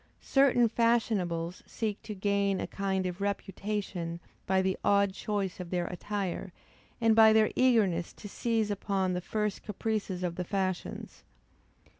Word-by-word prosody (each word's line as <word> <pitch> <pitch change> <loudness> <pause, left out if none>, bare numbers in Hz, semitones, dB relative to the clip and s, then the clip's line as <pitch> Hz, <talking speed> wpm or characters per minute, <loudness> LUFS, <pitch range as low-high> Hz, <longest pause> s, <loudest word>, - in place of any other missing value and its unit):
Certain 265 -3 +4
fashionables 205 -7 0
seek 215 -3 -3
to 215 - -7
gain 200 0 +1
a - - -2
kind 190 -1 -2
of 180 +1 -4
reputation 195 -3 -3 0.3
by 190 0 +3
the 190 0 +1
odd 200 -1 +3
choice 200 -2 -3
of 180 -2 -6
their 175 -1 -1
attire, 190 0 -4 0.5
and 225 -2 +4
by 220 -1 +8
their 220 0 +4
eagerness 205 -10 +3
to - - -10
seize 225 0 0
upon 195 -2 0
the 180 - -2
first 210 +2 -2
caprices 210 -3 -3
of 170 -1 -2
the 180 - -1
fashions. 185 -1 -3
200 Hz, 145 wpm, -30 LUFS, 185-215 Hz, 0.5 s, by